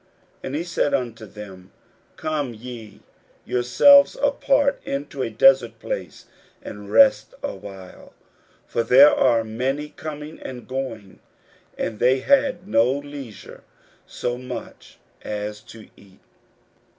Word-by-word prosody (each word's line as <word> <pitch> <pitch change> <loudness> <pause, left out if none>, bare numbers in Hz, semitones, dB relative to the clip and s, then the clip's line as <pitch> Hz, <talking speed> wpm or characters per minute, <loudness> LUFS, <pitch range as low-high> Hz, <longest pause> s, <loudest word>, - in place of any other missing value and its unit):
41:006:031 - - -37 0.4
And 135 - -4
he 160 - -2
said 170 -4 -1
unto 120 -4 -4
them, 95 -3 -12 0.5
Come 150 -5 -3
ye 115 -2 -10 0.4
yourselves 280 - +5
apart 280 0 +1
into 140 0 -5
a 115 - -1
desert 120 0 +4
place, - - -6 0.4
and 105 0 -9
rest 275 -1 +4
a 285 - -3
while: 95 -2 -12 0.5
for - - -1
there 135 +5 +7
were 115 -3 +3
many 130 +7 -3
coming 150 0 -8
and 125 -2 -9
going, 125 -7 -6 0.6
and 110 -2 -4
they 130 +1 +3
had 265 - +2
no 120 - +3
leisure 140 -5 -8 0.5
so 120 0 -4
much 130 - -9 0.2
as 105 0 -5
to 115 -1 -12
eat. 95 -1 -20
125 Hz, 125 wpm, -22 LUFS, 110-145 Hz, 0.6 s, there